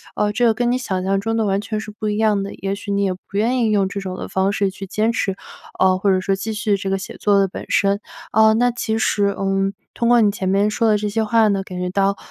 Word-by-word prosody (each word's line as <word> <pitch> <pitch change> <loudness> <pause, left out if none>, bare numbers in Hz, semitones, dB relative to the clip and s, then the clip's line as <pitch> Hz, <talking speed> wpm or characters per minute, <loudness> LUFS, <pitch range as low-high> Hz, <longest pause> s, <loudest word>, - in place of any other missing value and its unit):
呃， 210 0 +1
这 245 +3 +1
个 230 - +4
跟 240 +2 0
你 250 - +1
想 190 -7 -3
象 195 +1 +1
中 225 +3 -2
的 225 -1 +1
完 195 -1 +1
全 215 +1 -4
是 215 - -7
不 215 +1 -5
一 210 0 -1
样 215 -2 +2
的。 200 - -6
也 195 0 -3
许 200 0 -6
你 200 0 +1
也 195 - +1
不 180 - -13
愿 225 +6 +1
意 225 -3 +2
用 200 -2 +2
这 200 - -4
种 190 -2 -5
的 - - -6
方 190 +1 +1
式 200 -1 0
去 195 +1 -8
坚 215 +4 0
持， 195 -4 -1 0.4
呃， 185 0 +4
或 195 +1 +2
者 185 -1 +2
说 195 +1 0
继 215 +3 -4
续 210 -1 0
写 195 0 -4
作 205 -1 +3
的 195 - +3
本 185 - -8
身。 200 0 +2 0.3
哦， 220 0 +5
那 245 +2 +3
其 225 -2 -2
实， 200 -2 +1
嗯， 195 0 0 0.2
通 235 - 0
过 240 0 +6
你 215 -2 +4
前 200 -2 -3
面 200 +2 +2
说 225 +1 +1
的 210 - +4
这 210 0 -2
些 220 +2 0
话 220 0 +3
呢， 200 -2 0
感 185 -1 -8
觉 180 0 -2
到， 195 +1 +1
200 Hz, 300 characters per minute, -20 LUFS, 195-220 Hz, 0.4 s, 过